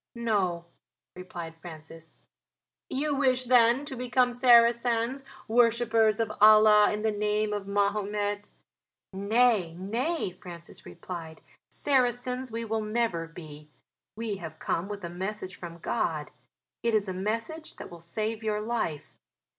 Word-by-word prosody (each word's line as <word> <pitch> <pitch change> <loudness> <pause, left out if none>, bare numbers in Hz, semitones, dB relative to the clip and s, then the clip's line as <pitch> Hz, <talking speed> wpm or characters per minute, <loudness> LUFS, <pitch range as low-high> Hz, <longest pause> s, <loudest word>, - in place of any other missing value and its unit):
"No," 195 -7 0 0.5
replied 175 -2 -8
Francis. 160 -1 -12 0.7
"You 290 +3 -1
wish 255 -2 +2
then 245 +2 +4
to 270 - -6
become 250 0 +1
Saracens 240 +1 +4 0.2
worshippers 230 -1 +3
of 225 -2 0
Allah 215 0 +7
in 210 0 -3
the 220 - +2
name 210 0 0
of 205 -1 -4
Mahomet?" 205 0 -1 0.6
"Nay, 200 -3 +2
nay," 230 - -2
answered 185 - -23
Francis, 170 -1 -10 0.9
"Saracens 250 -2 0
we 230 +1 -3
will 220 0 -1
never 215 -6 -1
be. 150 -3 -12 0.5
We 220 -2 -3
have 165 -4 -8
come 170 +4 -2
with 205 -2 -6
a - - -3
message 190 +2 -5
from 170 -2 -9
God; - - -2 0.5
it 230 -1 +1
is 210 -2 +1
a 185 - -3
message 225 - -4
that - - -10
will 170 -1 -11
save 215 +6 -3
your 210 -1 0
life. 210 -9 -3
215 Hz, 130 wpm, -28 LUFS, 185-235 Hz, 0.9 s, Allah